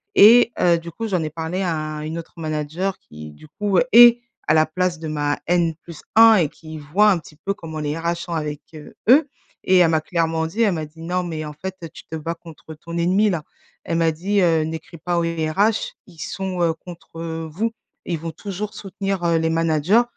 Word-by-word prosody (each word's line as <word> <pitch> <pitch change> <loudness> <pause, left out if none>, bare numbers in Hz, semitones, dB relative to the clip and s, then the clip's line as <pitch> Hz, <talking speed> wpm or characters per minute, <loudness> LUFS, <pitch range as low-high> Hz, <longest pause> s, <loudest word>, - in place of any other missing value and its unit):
et 235 +3 +7
heu, 170 -1 +4
du 170 0 -8
coup 225 +6 -5
j'en 185 -5 0
ai 155 - -4
parlé 165 +4 -3
à 155 -3 -3
une 160 +2 -4
autre 165 - -11
manager 155 +4 -3
qui, 75 0 -11
du 75 - -16
coup, 200 +2 0
est 240 0 +9 0.3
à 155 - +4
la 155 - +5
place 180 +1 -1
de 160 - -6
ma 145 -1 -1
N+1 175 +6 +3
et - - 0
qui 155 0 -11
voit 185 +9 +3
un 180 - +1
petit 155 -1 -16
peu 195 +5 -2
comment 160 -3 -7
les 150 +1 -2
RH 170 +1 -1
sont 170 0 -6
avec, 150 -2 -3
heu, 150 - -12
eux 275 +4 +6 0.4
et 185 - +4
elle 170 - +5
m'a 160 -1 +2
clairement 160 0 -1
dit, 210 +8 -3
elle 205 -5 +3
m'a 155 -1 -3
dit: 160 +2 -15
«Non 180 +2 -1
mais 160 -3 -4
en 150 - -6
fait, 185 +5 -6
heu, 165 - -6
tu - - -12
te 160 - -6
bats 165 +2 -4
contre 160 -1 -12
ton 170 +2 -9
ennemi 190 +5 +3
là». 160 -4 -3 0.4
Elle 165 - -1
m'a 165 -1 +3
dit, 195 +6 -1
heu: 165 -3 +3
«N'écris 160 +1 -7
pas 175 +1 -1
aux 170 - 0
RH 165 +6 0
ils 170 -4 -17
sont, 190 -1 -4
heu, 165 -1 +2
contre 165 -1 -8
vous, 220 +8 -1 0.3
ils 170 -3 -2
vont 165 +1 -5
toujours 205 +4 -6
soutenir, 195 -1 -4
heu, 170 -1 +3
les 160 0 0
managers 165 +7 +3
165 Hz, 220 wpm, -21 LUFS, 155-185 Hz, 0.4 s, est